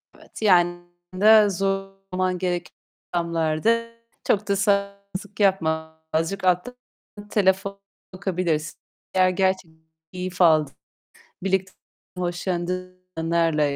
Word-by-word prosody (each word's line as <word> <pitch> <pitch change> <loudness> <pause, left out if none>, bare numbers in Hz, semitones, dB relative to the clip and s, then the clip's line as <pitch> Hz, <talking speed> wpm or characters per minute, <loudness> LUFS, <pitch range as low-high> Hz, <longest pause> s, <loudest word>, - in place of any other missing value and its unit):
Evet, - - -13
yani 175 -4 +4 0.3
de 210 +2 +6
zorlaman 195 -1 -2
gereken 175 -1 -2 0.4
ortamlarda 170 +7 +1 0.3
çok 205 0 +1
da 200 - +2
sal 200 0 +2 0.5
yapma 160 -5 +1
azıcık 165 +5 -1
alttan 180 +7 +1 0.5
telefon 200 0 +1 0.3
bakabilirsin. 180 -5 -2 0.3
Eğer 185 -1 +4
gerçekten 185 -4 -1 0.3
keyif 180 0 -4
aldığın, 155 -5 +4 0.7
birlikte 190 0 0 0.5
hoşlandığın 180 +1 -3 0.2
anlarla 165 -1 +1
185 Hz, 90 wpm, -24 LUFS, 170-195 Hz, 0.7 s, de